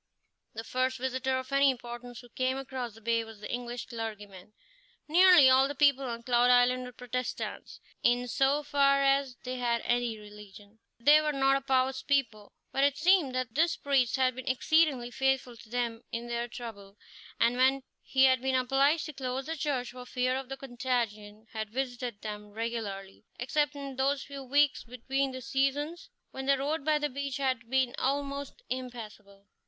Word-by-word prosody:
The 225 - -5
first 255 +2 -1
visitor 260 +1 -1
of 260 +1 -6
any 275 0 +5
importance 240 -1 -6
who 245 - -16
came 260 +1 -1
across 260 -4 -5
the 225 - -15
bay 230 +1 +1
was 225 -2 -12
the 210 - -6
English 245 0 -4
clergyman. 210 -4 -7 0.5
Nearly 350 -2 +7
all 260 +1 +5
the 285 - -5
people 280 -1 +3
on 235 -2 -5
Cloud 245 0 +3
Island 250 +1 +4
were 250 - -8
Protestants, 250 0 -5 0.2
in 245 +1 +2
so 270 +6 +1
far 275 -1 +3
as 275 -2 +2
they 255 0 -4
had 235 -1 0
any 240 -2 0
religion. 210 0 -14 0.2
They 295 +5 +6
were 305 0 0
not 270 -1 +3
a - - -5
pious 260 -1 +1
people, 230 -7 -1 0.2
but 270 - +1
it 285 0 +3
seemed 350 -8 +3
that 255 -3 -2
this 330 +4 +2
priest 270 -4 +1
had 260 -1 +2
been 255 +1 -9
exceedingly 260 -1 +2
faithful 265 -2 0
to 220 - -15
them 235 -1 -2
in 230 +1 -4
their 235 0 -2
trouble, 215 -4 -9 0.4
and 235 +1 +3
when 265 +1 +3 0.2
he 265 0 +2
had 260 -1 +5
been 265 0 0
obliged 275 +4 +2
to 305 - -7
close 260 0 -4
the 325 +2 -3
church 280 -5 -2
for 250 0 -10
fear 255 0 0
of 265 -1 -5
the 270 - -5
contagion, 235 -5 -3
had 220 -1 -4
visited 245 -2 -4
them 210 -1 -6
regularly, 205 -3 -5
except 295 +4 0
in 275 -2 -7
those 275 +1 +1
few 280 0 -8
weeks 285 +2 +2
between 265 +3 -2
the 260 0 -7
seasons 290 - -1 0.2
when 265 0 -6
the 275 0 +4
road 295 +3 -2
by 305 +1 +2
the 295 0 0
beach 280 0 -4
had 255 -4 -1
been 260 -1 +1
almost 280 - -2
impassable. 225 -6 -7
255 Hz, 180 wpm, -29 LUFS, 235-275 Hz, 0.5 s, Nearly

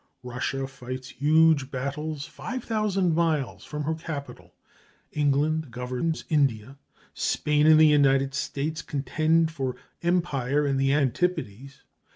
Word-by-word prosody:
Russia 125 +2 -3
fights 130 0 -8
huge 155 -1 +3
battles 140 +2 -4
five 255 +1 -6
thousand 200 -6 0
miles 160 -5 0
from 150 0 -5
her 160 +2 -1
capital. 160 -3 -8 0.6
England 150 +1 +1
governs 125 +7 -3
India. 135 -4 0 0.3
Spain 150 0 +1
and 155 0 +7
the 160 - +8
United 135 -2 +4
States 150 +3 -3
contend 155 +3 +1
for 135 -4 -3 0.3
empire 150 -5 0
in 140 -1 0
the 135 0 +2
antipodes. 140 - -1
145 Hz, 120 wpm, -26 LUFS, 135-160 Hz, 0.6 s, the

